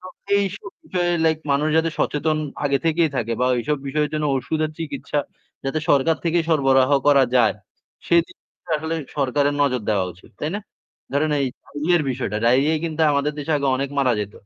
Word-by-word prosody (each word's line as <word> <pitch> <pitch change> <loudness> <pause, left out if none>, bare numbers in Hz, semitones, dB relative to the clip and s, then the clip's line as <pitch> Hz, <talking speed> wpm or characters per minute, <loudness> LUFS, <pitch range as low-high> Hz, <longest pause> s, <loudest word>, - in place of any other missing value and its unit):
তো 185 - -11 0.3
এইসব 195 0 -4 0.2
বিষয়ে 175 -1 0
লাইক 160 -1 +2
মানুষ 150 +2 +1
যাতে 160 0 +2
সচেতন 155 +1 0 0.3
আগে 140 -1 +2
থেকেই 165 0 +3
থাকে 115 -2 -1
বা 125 - +3
ওইসব 135 +5 -1
বিষয়ের 150 +2 0
জন্য 150 0 -1
ঔষুধের 155 +4 -1
চিকিৎসা 145 -2 -3 0.5
যাতে 135 +3 -1
সরকার 145 +3 +3
থেকেই 170 0 +1
সরবরাহ 135 -4 +3 0.2
করা 140 -2 +6
যায়, 115 -4 +4 0.5
সেদিকটায় 170 0 -1
আসলে 160 +1 -3 0.2
সরকারের 145 +1 +1
নজর 130 -3 +1
দেওয়া 100 -3 +2
উচিত, 90 - -20
তাই 150 - -2
না? - - -5 0.5
ধরেন 150 +2 +1
এই 135 - +1 0.2
ডায়রিয়ার 155 +3 0
বিষয়টা, 120 -5 -3
ডায়রিয়ায় 140 +6 +3
কিন্তু 160 -1 -3
আমাদের 140 +1 0
দেশে 150 +2 -2
আগে 140 - -1
অনেক 140 +1 -2
মারা 130 -3 +3
যেত। 105 0 -5
145 Hz, 175 wpm, -22 LUFS, 135-160 Hz, 0.5 s, করা